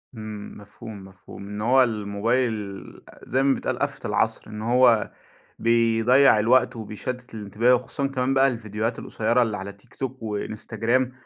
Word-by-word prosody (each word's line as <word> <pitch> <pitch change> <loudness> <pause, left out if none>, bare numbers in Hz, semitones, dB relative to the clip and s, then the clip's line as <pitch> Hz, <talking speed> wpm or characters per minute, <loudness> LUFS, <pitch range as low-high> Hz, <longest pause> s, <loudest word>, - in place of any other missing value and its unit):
امم، 110 -2 -8
مفهوم، 105 0 -11
مفهوم، 95 +1 -12
إن 105 +1 -6
هو 130 +3 +5
الموبايل 105 -1 -1 0.4
زي 130 +2 0
ما 135 -1 +4
بيتقال - - -3
آفة - - -2
العصر، - - 0
إن 105 0 -7
هو 120 -1 +4 0.5
بيضيع 115 +2 +4
الوقت 120 +4 +3
وبيشتت 120 +3 -6
الانتباه، 110 +4 +1
وخصوصًا 125 +3 -2
كمان 130 0 -1
بقى 135 0 +5
الفيديوهات 115 -1 -3
القصيرة 115 +3 0
اللي 110 -3 0
على 100 +1 -7
تيك 100 - -24
توك 130 -2 -5
وإنستجرام 115 +4 -1
115 Hz, 145 wpm, -24 LUFS, 105-125 Hz, 0.5 s, هو